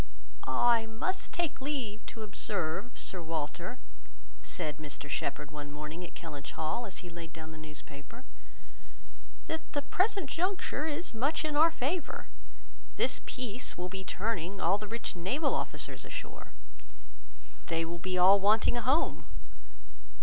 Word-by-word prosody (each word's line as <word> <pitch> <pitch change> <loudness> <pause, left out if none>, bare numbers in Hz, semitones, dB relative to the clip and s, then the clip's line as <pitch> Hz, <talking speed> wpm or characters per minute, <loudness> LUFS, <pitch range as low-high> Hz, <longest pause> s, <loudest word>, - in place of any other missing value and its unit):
"I 235 -2 +5
must 295 +13 -1
take 330 -5 0
leave 255 -7 -1
to 225 - -5
observe, 195 +1 -1
Sir 185 - -3
Walter," 165 +6 -2 0.6
said 155 -3 -2
Mr 145 -1 -5
Shepherd 145 +1 -1
one 145 -1 -5
morning 150 +4 -5
at 175 - -8
Kellynch 150 -4 -6
Hall, 160 +10 -1
as 185 -1 -5
he - - -5
laid 165 -1 -7
down 160 -1 -7
the 160 - -9
newspaper, 150 - -7 1.2
"that 320 0 -4
the 285 -1 +1
present 370 +3 +2
juncture 340 -2 0
is 320 +1 -2
much 285 +8 +2
in 305 -1 0
our 315 +3 +8
favour. 315 +2 -1 0.7
This - - +2
peace 250 -1 -2
will 180 +1 -2
be 190 +1 -4
turning 195 -2 -1
all 190 +3 +4
our 210 - -3
rich 230 -1 -3
naval 260 - +2
officers - - -1
ashore. - - -6 1.2
They 165 0 +2
will 170 +1 -4
be 185 +1 0
all 190 +3 +9
wanting 215 +4 +5
a - - +1
home. 275 +7 +3
200 Hz, 145 wpm, -33 LUFS, 165-275 Hz, 1.2 s, all